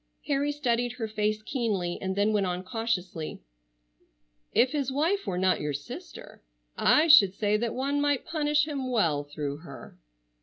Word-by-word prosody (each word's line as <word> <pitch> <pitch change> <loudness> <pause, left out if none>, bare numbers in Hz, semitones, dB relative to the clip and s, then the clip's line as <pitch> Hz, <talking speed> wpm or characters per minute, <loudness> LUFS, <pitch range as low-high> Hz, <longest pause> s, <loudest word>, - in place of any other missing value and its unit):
Harry 285 0 0
studied 245 -4 -1
her 230 -3 -4
face 215 0 -1
keenly, 210 -9 -2
and 190 0 -2
then 205 +2 +2
went 200 -3 +1
on 180 0 -3
cautiously: 185 -6 -3 1.1
"If 255 - +3
his 280 -3 -1
wife 335 +9 0
were 180 - -2
not 185 0 +2
your 150 -1 -2
sister 140 +1 -9 0.3
I 310 +2 +4
should 200 - +7
say 210 0 +1
that 230 +1 -2
one 280 +2 0
might 290 -2 +1
punish 300 -1 +1
him 275 -4 -3
well 165 -12 +1
through 145 -1 -5
her." 155 -2 -12
225 Hz, 160 wpm, -27 LUFS, 185-280 Hz, 1.1 s, should